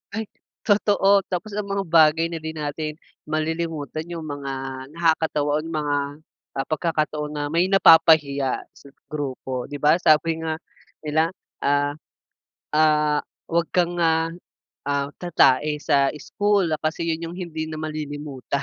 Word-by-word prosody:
Ay 220 - -1 0.4
totoo. 200 -1 +4
Tapos 190 +4 -4
ang 210 -1 -3
mga 195 0 -1
bagay 160 0 +5
na 165 - -4
'di 160 0 -5
natin 150 0 -3 0.3
malilimutan 155 0 -3
yung 170 -2 -6
mga 145 -2 -5 0.4
nakakatawa, 160 -3 +1
oh, - - -5
mga, 150 -3 -1 0.6
ah, 135 - -1
pagkakataon 155 -2 -1
na 145 - -2
may 170 +3 +2
napapahiya 160 -7 +5
sa - - -17 0.2
grupo, 130 -3 -4
'di 145 - -7
ba? 150 +3 +5
Sabi 160 +1 +3
nga 160 -1 -1 0.5
nila, 155 +2 +1 0.3
ah, 145 0 +2 0.8
ah, 150 -1 +3 0.3
wag 170 -1 +2
kang, 175 -1 +1
ah, 165 -1 +2 0.6
ah, 140 0 0
tatae 150 -3 +3
sa 140 -2 +3
school 205 +3 +1
kasi 160 +2 -2
yun 165 +1 -3
yung 175 - -9
hindi 160 -3 -4
na 155 - -5
malilimutan 145 -3 -4
155 Hz, 135 wpm, -23 LUFS, 145-165 Hz, 0.8 s, bagay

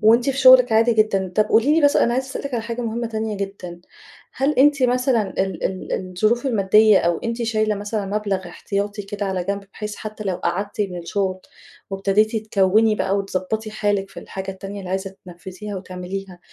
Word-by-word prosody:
وأنتِ 235 +4 +4
في 270 - -5
شغلِك 255 -2 +7
عادي 230 +2 +4
جدًا. 195 -4 +1
طب 215 - +5
قولي 230 +8 +3
لي 325 - +3
بس 285 - +4
أنا 235 - +3
عايزة 260 +1 -1
أسألِك 265 0 -5
عن 225 - -1
حاجة 235 +1 -4
مهمة 235 +1 -2
تانية 220 -2 -3
جدًا، 190 -3 -6 0.5
هل 275 +3 +1
أنتِ 280 -1 +5
مثلًا 250 -2 +2 0.2
ال 190 -3 -4
ال 190 -1 -3
الظروف 215 +8 0
المادية 215 -2 +5
أو 170 -1 +1
أنتِ 230 +1 -3
شايلة 215 -2 +1
مثلًا 205 0 -3
مبلغ 200 -2 -2
احتياطي 205 +3 -3
كده 205 +1 -4
على 185 -2 -2
جنب، 200 +1 -3
بحيث 210 -1 -6
حتّى 215 0 -7
لو 185 -2 -1
قعدتِ 200 +3 -3
من 185 -3 -2
الشغل 185 +2 -2 0.5
وابتديتي 205 +3 +1
تكوّني 215 +1 +3
بقى 195 -1 0
وتضبّطي 200 +3 -3
حالِك 205 -2 -1
في - - -9
الحاجة 190 0 -6
التانية 195 +1 -8
اللي 185 - -7
عايزة 190 0 -3
تنفذيها 190 +3 -8
وتعمليها، 185 0 -7
205 Hz, 185 wpm, -21 LUFS, 190-225 Hz, 0.5 s, شغلِك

